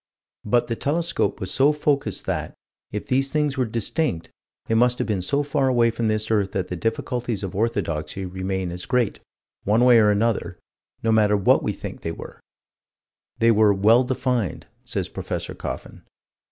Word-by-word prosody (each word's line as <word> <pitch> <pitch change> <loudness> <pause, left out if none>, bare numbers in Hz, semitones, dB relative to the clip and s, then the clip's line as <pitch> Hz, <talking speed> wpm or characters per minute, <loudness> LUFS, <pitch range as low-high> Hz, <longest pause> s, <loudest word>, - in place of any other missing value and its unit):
But 120 +3 +2
the 115 - -3
telescope 160 -6 -1
was 95 - -4
so 140 +2 +4
focused 145 -2 -1
that, - - -3 0.4
if 105 - -4
these 135 +1 0
things 150 -2 0
were 130 -3 0
distinct, 115 - -2 0.3
they - - -1
must 125 +2 +3
have - - -1
been 105 -4 -1
so 140 +10 +1
far 140 -1 0
away 120 -2 +3
from 115 0 -2
this 110 0 -1
earth 100 -3 +1
that 95 - -2
the 90 - -3
difficulties 115 +2 -2
of 95 - -4
orthodoxy 95 -6 -2
remain 95 0 -3
as 90 +1 -7
great, 125 -4 +1 0.4
one 110 +4 +3
way 120 -2 +7
or 105 -1 +5
another, 110 +2 0 0.5
no 115 - +2
matter 105 -2 +4
what 100 - +4
we - - -1
think - - -8
they 80 - -3
were - - -10 1.0
They 115 0 +4
were 105 -2 +4
"well 110 +6 +5
defined," 125 - -1 0.2
says - - -3
Prof. - - -5
Coffin. - - -6
115 Hz, 175 wpm, -23 LUFS, 100-125 Hz, 1.0 s, way